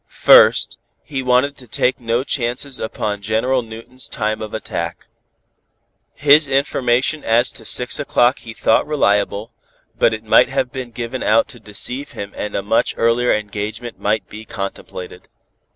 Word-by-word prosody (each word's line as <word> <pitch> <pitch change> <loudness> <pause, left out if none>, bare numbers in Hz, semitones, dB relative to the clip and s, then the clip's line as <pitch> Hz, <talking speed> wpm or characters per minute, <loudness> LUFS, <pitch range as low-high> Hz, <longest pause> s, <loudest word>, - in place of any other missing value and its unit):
First, - - +5 0.2
he 135 -3 -4
wanted 130 +3 +2
to 125 - -14
take 125 +4 0
no 120 +1 -1
chances 130 0 -2
upon 105 -2 -3
General 115 +5 0
Newton's 115 +3 -5
time 110 -1 -2
of 110 -1 -6
attack. 110 - -5 1.1
His 145 +1 +5
information 135 +1 +1
as 115 +2 +2
to - - -13
six 125 +3 +2
o'clock 125 -2 +2
he 115 - -10
thought 110 - +2
reliable, 105 -7 0 0.5
but - - +4
it 110 0 -5
might 110 +3 +4
have 130 -2 -1
been 130 -2 -6
given 120 +2 -5
out 110 +2 +3
to - - -12
deceive 125 +7 -4
him 100 0 -7
and 105 - -5
a 100 - -1
much 105 - +1
earlier 115 +2 +2
engagement 105 +3 -4
might 105 +1 -1
be 110 +1 -10
contemplated. 95 -3 -7
120 Hz, 150 wpm, -19 LUFS, 110-130 Hz, 1.1 s, First